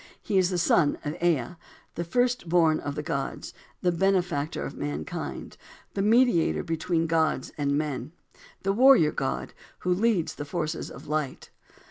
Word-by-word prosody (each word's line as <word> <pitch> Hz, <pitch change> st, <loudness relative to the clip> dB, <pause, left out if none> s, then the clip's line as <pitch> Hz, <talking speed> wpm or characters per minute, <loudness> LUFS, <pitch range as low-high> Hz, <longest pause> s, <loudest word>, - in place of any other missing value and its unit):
He 200 Hz, -3 st, +1 dB
is 180 Hz, -1 st, +3 dB
the 180 Hz, -, -1 dB
son 165 Hz, -3 st, +3 dB
of 150 Hz, -, -2 dB
Ea, 170 Hz, 0 st, +1 dB, 0.4 s
"The 170 Hz, -, -3 dB
first 245 Hz, +1 st, 0 dB
born 165 Hz, -2 st, +4 dB
of 145 Hz, -1 st, -4 dB
the 150 Hz, -, -3 dB
gods," 140 Hz, -4 st, -4 dB, 0.3 s
"The 180 Hz, -, +3 dB
benefactor 175 Hz, -4 st, 0 dB
of -, -, -6 dB
mankind," 75 Hz, +1 st, -5 dB, 0.4 s
"The 195 Hz, -, -1 dB
mediator 225 Hz, -4 st, +3 dB
between 165 Hz, 0 st, -1 dB
gods 160 Hz, -1 st, 0 dB
and 140 Hz, -1 st, 0 dB
men," 150 Hz, -1 st, -3 dB, 0.5 s
"The 195 Hz, 0 st, +1 dB
warrior 245 Hz, -, +6 dB
god, 65 Hz, 0 st, -3 dB, 0.3 s
who 180 Hz, -, +1 dB
leads 200 Hz, -3 st, +1 dB
the -, -, -6 dB
forces 160 Hz, 0 st, -3 dB
of -, -, -11 dB
light." 150 Hz, -3 st, -3 dB
165 Hz, 155 wpm, -27 LUFS, 150-185 Hz, 0.5 s, warrior